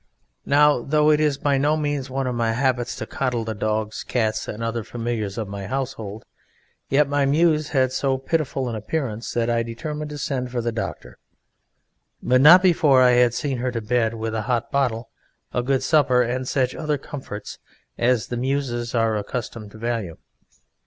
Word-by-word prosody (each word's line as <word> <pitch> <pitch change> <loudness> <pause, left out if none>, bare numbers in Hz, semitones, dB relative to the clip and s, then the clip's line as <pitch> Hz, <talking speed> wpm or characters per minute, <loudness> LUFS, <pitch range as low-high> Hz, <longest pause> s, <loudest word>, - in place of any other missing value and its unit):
Now, 145 -2 +4
though 150 +3 +3
it 150 - +3
is 150 -2 +2
by 140 -1 +1
no 150 +3 +2
means 145 -3 -2
one 135 +1 -2
of 125 - -1
my 115 -1 0
habits 125 -1 0
to - - -5
coddle 125 -4 -2
the 110 0 -3
dogs, 110 +1 -2
cats 110 -3 -1
and 110 +2 -5
other 115 0 -2
familiars 115 -3 -4
of 110 -3 -3
my 100 -1 -6
household, 110 -5 -4 0.6
yet 145 +1 +3
my 145 0 +1
Muse 155 +1 +3
had 130 -3 +2
so 135 0 0
pitiful 135 -2 -1
an 120 - -3
appearance 115 0 -3
that 115 -1 0
I 120 -1 +1
determined 150 +6 -5
to 150 - -6
send 130 -3 -2
for 125 -1 -3
the 120 0 -1
doctor, 110 0 -6 1.0
but 125 +1 +3
not 175 +6 +9
before 150 -7 +5
I 125 - +6
had 120 -1 +4
seen 135 -1 -2
her 125 +1 -1
to 120 - -2
bed 115 0 0
with 110 0 -4
a 110 - -1
hot 120 -2 0
bottle, 120 -4 -1 0.4
a 125 - +1
good 130 +1 0
supper, 130 -6 +3
and 125 +2 -2
such 130 -1 0
other 150 -2 -1
comforts 130 -6 -8 0.4
as 120 -1 +2
the 125 -1 -5
Muses 125 -2 -2
are 115 -1 +2
accustomed 110 0 -5
to - - -11
value. 110 -7 -3
125 Hz, 185 wpm, -23 LUFS, 115-140 Hz, 1.0 s, not